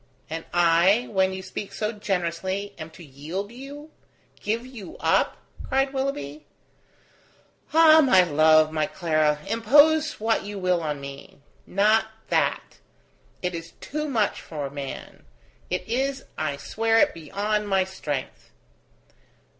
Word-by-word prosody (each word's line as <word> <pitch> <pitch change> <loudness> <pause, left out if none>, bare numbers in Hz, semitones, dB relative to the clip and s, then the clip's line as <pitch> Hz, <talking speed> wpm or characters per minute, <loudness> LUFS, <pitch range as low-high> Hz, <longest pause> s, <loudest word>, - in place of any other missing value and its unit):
"And 165 0 -4
I, 175 +6 +4
when 190 -2 +2
you 190 0 -6
speak 190 +2 -6
so 215 0 -2
generously, 190 -1 -3
am 155 0 -7
to 165 +2 -14
yield 160 +9 -6
you? 285 +5 -10 0.5
give 225 +4 -2
you 235 -8 -10
up?" - - +2 0.3
cried 270 +1 0
Willoughby. 150 - -4 1.2
"Ah! 320 0 +7
my 190 -11 +6
love, 155 -1 +4
my 155 -1 0
Clara, 155 -3 +1
impose 295 +7 +4
what 225 +1 +1
you 205 +1 -6
will 180 -2 +1
on 150 -2 -3
me; 140 0 -10 0.3
not 215 +3 +3 0.2
that. - - 0 0.6
It 180 0 -1
is 165 0 -7
too 305 +1 -5
much 220 -6 0
for 145 -4 -6
man. 140 -1 -7 0.5
It 180 0 -3
is, 265 +4 -1
I 155 -2 -2
swear 225 +9 0
it, - - +4
beyond 205 +6 -2
my 190 -1 +3
strength." 150 -8 -6
190 Hz, 130 wpm, -25 LUFS, 160-225 Hz, 1.2 s, Ah